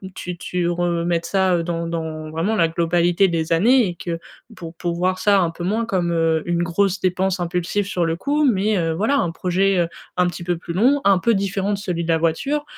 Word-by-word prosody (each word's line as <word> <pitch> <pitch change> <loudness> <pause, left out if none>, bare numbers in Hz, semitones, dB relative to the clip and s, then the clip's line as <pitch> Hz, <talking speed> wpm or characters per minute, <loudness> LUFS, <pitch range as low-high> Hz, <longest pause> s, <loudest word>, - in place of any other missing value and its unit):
tu 180 -1 -6
tu 180 0 -2
remettes 170 -1 -1
ça, 190 -2 +2
heu, 170 - -2
dans 170 0 -3
dans 160 -2 -4
vraiment 175 +8 -1
la 165 -4 +2
globalité 170 +3 +2
des 165 -2 -2
années 235 +9 +4
et 175 - -6
que 170 0 -4 0.4
pour 165 -1 -9
pour 170 -1 -2
voir 185 +2 0
ça 200 -2 +4
un 170 - +1
peu 175 +1 -6
moins 220 +4 0
comme, 180 -5 -1
heu, 165 -1 +1
une 175 0 0
grosse 195 +3 0
dépense 185 0 0
impulsive 180 +3 -1
sur 180 -3 -1
le 165 0 0
coup 295 - 0
mais, 210 -1 +1
heu, 165 -2 0
voilà, 220 +11 +1
un 175 - +1
projet, 190 +3 +1
heu, 170 - +2 0.3
un 180 0 +2
petit 175 0 -6
peu 175 -1 0
plus 170 - -8
long, 260 +10 +3
un 195 -2 +4
peu 230 +4 +2
différent 195 0 -1
de 200 - -1
celui 175 -4 -3
de - - -8
la 165 -1 +3
voiture, 220 - -1
175 Hz, 230 wpm, -21 LUFS, 170-195 Hz, 0.4 s, années